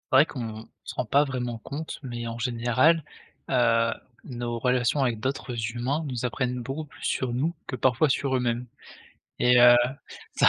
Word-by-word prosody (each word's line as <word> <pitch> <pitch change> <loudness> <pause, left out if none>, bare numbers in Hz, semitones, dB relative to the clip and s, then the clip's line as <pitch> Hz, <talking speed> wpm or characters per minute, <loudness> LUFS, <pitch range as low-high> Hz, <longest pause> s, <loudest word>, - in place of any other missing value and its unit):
C'est - - +8
vrai 150 - +7
qu'on 115 -6 -6 0.2
se - - -8
rend 125 - -1
pas 140 +7 +4
vraiment 125 -4 -3
compte, 145 +7 -6
mais 120 -2 -5
en 115 0 -5
général, 125 +6 +2 0.5
heu, 115 -2 +3 0.3
nos 120 -2 -4
relations 125 +3 +1
avec 115 -4 -1
d'autres 130 0 -3 0.2
humains 130 +6 -1
nous 125 -3 -3
apprennent 125 0 -2
beaucoup 135 +6 -4
plus 150 - -16
sur 125 -2 -1
nous 150 +8 0
que 130 - -5
parfois 130 +5 +3
sur 135 0 +1
eux-mêmes. 125 -1 -1 0.7
Et 125 0 +5
heu, 120 0 +9 0.6
ça - - +5
125 Hz, 170 wpm, -26 LUFS, 120-135 Hz, 0.7 s, heu